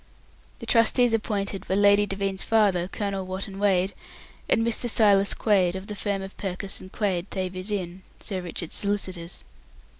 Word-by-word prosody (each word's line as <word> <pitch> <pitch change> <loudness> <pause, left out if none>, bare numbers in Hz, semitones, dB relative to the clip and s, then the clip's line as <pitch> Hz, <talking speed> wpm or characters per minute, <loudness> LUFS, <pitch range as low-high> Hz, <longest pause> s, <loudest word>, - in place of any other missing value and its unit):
The - - -8
trustees 235 +1 +4
appointed 200 -3 -2
were 190 - +2
Lady 205 +1 +5
Devine's 195 0 -1
father, 200 -6 +2
Colonel 200 -1 -3
Wotton 190 +1 -5
Wade, 195 -1 +2 0.6
and 225 - +3
Mr. 235 +1 0
Silas 205 -3 +4
Quaid, 190 -5 +2
of 190 0 -6
the 210 - -6
firm 200 -1 -2
of 195 - -9
Purkiss 195 0 -3
and 185 - -11
Quaid 190 -3 -1
Thavies 185 0 -4
Inn, 185 -3 -3 0.2
Sir 190 -3 -3
Richard's 170 -2 -6
solicitors. 190 -4 -2
195 Hz, 155 wpm, -26 LUFS, 185-205 Hz, 0.6 s, Lady